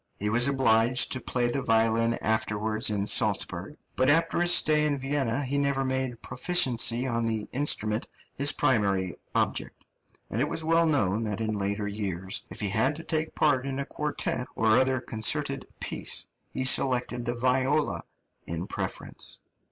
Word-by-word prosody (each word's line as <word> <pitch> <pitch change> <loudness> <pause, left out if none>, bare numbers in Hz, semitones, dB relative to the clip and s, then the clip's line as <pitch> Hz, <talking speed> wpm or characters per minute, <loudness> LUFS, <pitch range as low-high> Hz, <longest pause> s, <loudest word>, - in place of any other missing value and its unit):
He 105 - -2
was 120 +4 +3
obliged 125 -2 +3
to 130 - -2
play 120 0 -1
the 130 +3 -1
violin 115 0 +2
afterwards 110 0 0
in 100 -1 -1
Salzburg; - - +2 0.2
but 130 +1 +2
after 165 +3 +2
his 175 0 +4
stay 155 -3 +4
in 150 -2 0
Vienna 135 -1 -2
he 140 +2 -1
never 140 -1 0
made 130 -2 -3
proficiency 125 -3 +2
on 115 -2 -1
the 110 -2 -3
instrument 115 -5 0 0.3
his 140 +1 +3
primary 100 - 0 0.2
object, - - -1 0.5
and 115 - -1
it 150 +3 -1
is 160 - +1
well 165 +1 +3
known 110 -8 +1
that 105 0 -3
in 110 -1 -2
later 100 +1 -2
years, 95 -3 -3
if - - -5
he 105 - -1
had 120 +9 +1
to 165 - -8
take 155 -1 -2
part 135 -3 +1
in 135 -1 -3
a 140 - -2
quartet 150 -4 -3
or 110 - +1
other 130 0 +1
concerted 110 -3 -1
piece, - - -2 0.2
he 130 - -4
selected 125 -2 +2
the 120 0 -2
viola 130 +4 0 0.5
in 85 +2 -4
preference. - - -5
125 Hz, 165 wpm, -27 LUFS, 110-140 Hz, 0.5 s, his